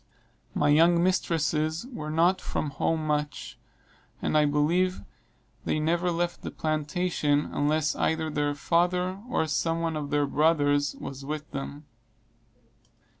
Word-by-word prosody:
My - - +2
young 170 +3 +5
mistresses 160 -1 0
were 155 -10 -6
not 170 +4 +2
from 150 - -3
home 155 +3 -1
much, 150 -1 -3 0.6
and - - -1
I 150 -1 +5
believe 165 +6 +1 0.6
they 155 - 0
never 170 +3 +1
left 175 0 -2
the - - -5
plantation 155 -1 0
unless 150 +1 +1
either 160 -1 0
their 145 -1 0
father 180 +4 0
or 160 - +1
some 165 +2 0
one 165 -1 -1
of 150 -2 -4
their 145 0 +2
brothers 145 -2 +2
was 135 0 -8
with 150 +1 -5
them. 140 +1 -6
155 Hz, 130 wpm, -27 LUFS, 145-170 Hz, 0.6 s, young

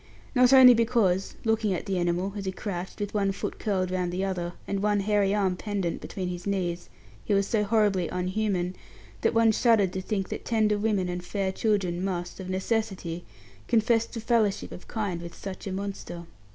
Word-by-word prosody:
Not 250 -1 +5
only 260 -2 +10
because, 225 -5 +1
looking 220 -3 +2
at - - -5
the 195 -3 -1
animal, 175 +3 0
as 200 -1 -5
he 190 - -1
crouched, 190 -1 -5
with 205 -1 -3
one 200 -2 +1
foot 195 - -5
curled 185 -4 0
round 180 -1 -1
the 185 +2 -1
other, 175 -2 -3
and 200 -1 -1
one 205 -1 +2
hairy 205 -1 +2
arm 190 -3 +1
pendant 195 -3 -3
between 185 -2 -4
his 180 +1 -5
knees, 180 -3 -2 0.3
he 205 - +1
was 200 0 +3
so 210 +1 +1
horribly 205 -4 +2
unhuman, 185 0 -1 0.5
that - - +1
one 225 -1 +5
shuddered 220 -5 +3
to 190 - -2
think 195 0 -2
that - - -5
tender 215 -2 +2
women 205 -4 +1
and 180 0 -4
fair 195 +1 -1
children 190 -4 0
must, 180 -2 -3
of 185 -1 -6
necessity, 185 -3 -2 0.4
confess 230 0 +3
to 230 - -7
fellowship 225 -3 +1
of 180 - -10
kind 200 -6 -3
with 170 -1 -8
such 195 0 -7
a - - -3
monster. 190 -3 -5
195 Hz, 190 wpm, -27 LUFS, 180-215 Hz, 0.5 s, only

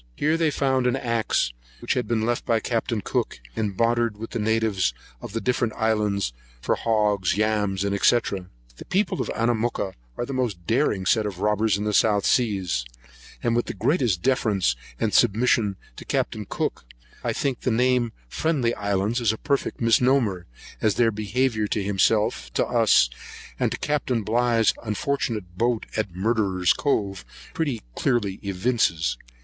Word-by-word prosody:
Here 155 +2 +1
they 165 -1 +2
found 130 -3 +1
an 125 - +2
axe, 115 - 0 0.3
which - - -1
had 125 - -1
been 110 -2 0
left 120 0 0
by 115 -2 +1
Capt. 115 +1 -2
Cook, - - -2 0.2
and 105 -4 -2
bartered 115 -2 +1
with 115 +2 -7
the 120 - -3
natives 110 - +1 0.3
of - - -8
the 115 - -1
different 120 -2 0
islands 105 - 0 0.3
for - - 0
hogs, 105 -5 +1
yams, 105 -3 +1
&c. 100 - 0 0.9
The - - -10
people 195 0 +1
of - - -3
Anamooka 115 -3 0 0.2
are - - -2
the 135 - -5
most 115 -10 -2
daring 110 - +1
set 110 +2 +2
of 100 -4 -6
robbers 105 0 +2
in 105 - -3
the 105 0 -1
South 105 -1 +3
Seas; 95 - +1 0.6
and, 115 -1 +1
with 120 - 0
the - - -4
greatest 120 - +1
deference 110 - +2 0.2
and 110 -2 0
submission 115 -2 +3 0.2
to - - -8
Capt. - - -1
Cook, - - -2 0.4
I - - 0
think 135 -4 -1
the - - -1
name 125 +1 +3
of 115 - -8 0.2
Friendly 140 -8 +1
Isles 100 +4 -1
is 115 -3 +3
a 110 - -4
perfect 140 -1 -1
misnomer, 115 -5 +2 0.3
as 105 -3 +2
their 115 -2 +3
behaviour 110 +1 0
to 105 0 -1
himself, 105 +2 +1
to - - +1
us, - - +4 0.5
and - - +1
to - - -2
Capt. 150 -1 -1 0.2
Bligh's 115 0 +3
unfortunate 110 -5 -3
boat 120 -1 +1
at 105 -5 -2
Murderer's 95 -3 +2
Cove, 100 -9 -1 0.3
pretty 140 -8 -2
clearly 105 - 0
evinces. 90 - 0
110 Hz, 165 wpm, -24 LUFS, 100-120 Hz, 0.9 s, us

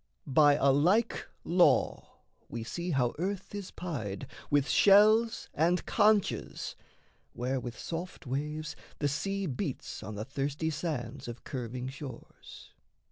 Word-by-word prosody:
By 145 +1 +5
a 140 -1 +4
like 185 - +2 0.2
law 175 +1 +2 0.3
we 115 -1 -4
see 170 +10 -4
how 130 -6 +1
earth 190 +2 -3
is 200 -2 -5
pied 135 - -5 0.2
With 145 -1 +3
shells 215 +3 +5
and 170 +4 +2
conchs, 210 -2 +2 0.6
where, 130 +2 -1
with 120 -2 -6
soft 175 +1 -6
waves, 150 +3 -3 0.2
the 145 - +1
sea 195 +7 -1
Beats 140 -1 -4
on 110 - -6
the 105 +2 -4
thirsty 140 +4 -2
sands 145 -8 -4
of 120 0 -7
curving 125 -2 -4
shores. 135 0 -10
150 Hz, 130 wpm, -31 LUFS, 130-180 Hz, 0.6 s, By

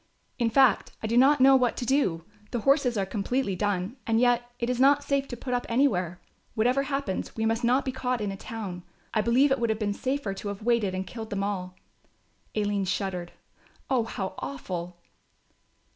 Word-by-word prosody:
In 235 -1 +2
fact, 260 -2 +3
I - - -1
do 225 +2 0
not 270 +4 +6
know 270 +1 +8
what 250 -2 +2
to 245 - -3
do, 205 - +1 0.2
the 240 - -2
horses 275 -2 +3
are 195 - +1
completely 205 +2 -1
done 205 +3 -1
and 225 0 +3
yet 245 0 +2
it 235 - -2
is 250 0 -1
not 285 +2 +5
safe 280 -1 0
to 245 - -6
put 250 +1 -4
up 245 - -1
anywhere. 185 - +1 0.4
Whatever 250 +4 +2
happens 275 -7 -3
we 220 - -1
must 225 +1 0
not 250 +3 +3
be 260 - -1
caught 255 -1 -2
in 205 -2 -2
a - - -5
town. 195 -4 -6 0.3
I 215 - +2
believe 250 +6 +3
it 270 - +2
would 235 -1 0
have 220 - +1
been 210 -2 -1
safer 260 -2 -2
to 195 - -7
have 200 +1 -5
waited 225 -5 +1
and 190 0 -3
killed 225 0 -7
them 200 -1 -2
all." 185 -3 -3 0.8
Aline 205 -2 0
shuddered. 180 -2 -3 0.6
"Oh, 245 -4 +2
how 195 -4 -4
awful." 170 +6 -5
225 Hz, 200 wpm, -27 LUFS, 195-255 Hz, 0.8 s, know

